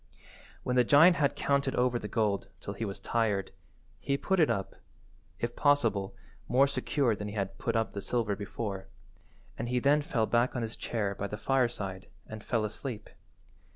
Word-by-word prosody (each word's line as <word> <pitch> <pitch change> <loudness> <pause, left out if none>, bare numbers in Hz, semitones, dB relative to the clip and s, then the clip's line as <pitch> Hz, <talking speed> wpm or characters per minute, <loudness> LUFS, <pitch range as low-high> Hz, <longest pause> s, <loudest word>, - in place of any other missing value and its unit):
When 125 - -1
the 125 - +6
giant 155 +7 +6
had 140 -1 +2
counted 140 -1 +1
over 125 -1 +2
the 105 - -5
gold 105 -3 0
till 100 - -6
he 110 +3 -3
was 100 -2 -5
tired, 105 -5 0 0.5
he 140 +8 0
put 190 +5 0
it 155 - +5
up, 95 - -2 0.6
if 120 +3 -3
possible 115 -10 +2 0.3
more 130 +3 +5
secure 140 -3 0
than 105 0 -5
he 105 - -6
had 95 -1 -3
put - - -1
up 115 0 0
the 100 - -4
silver 110 -2 0
before, 100 -1 -5 0.7
and 120 +1 -2
he 125 - +1
then 140 +4 +4
fell 145 -8 0
back 120 +3 +1
on 120 - -1
his 115 0 -4
chair 105 -4 -2
by 100 0 -4
the 105 - -5
fireside 105 -6 -1 0.2
and 110 0 -9
fell 115 -3 0
asleep. 110 0 -6
115 Hz, 185 wpm, -30 LUFS, 100-135 Hz, 0.7 s, the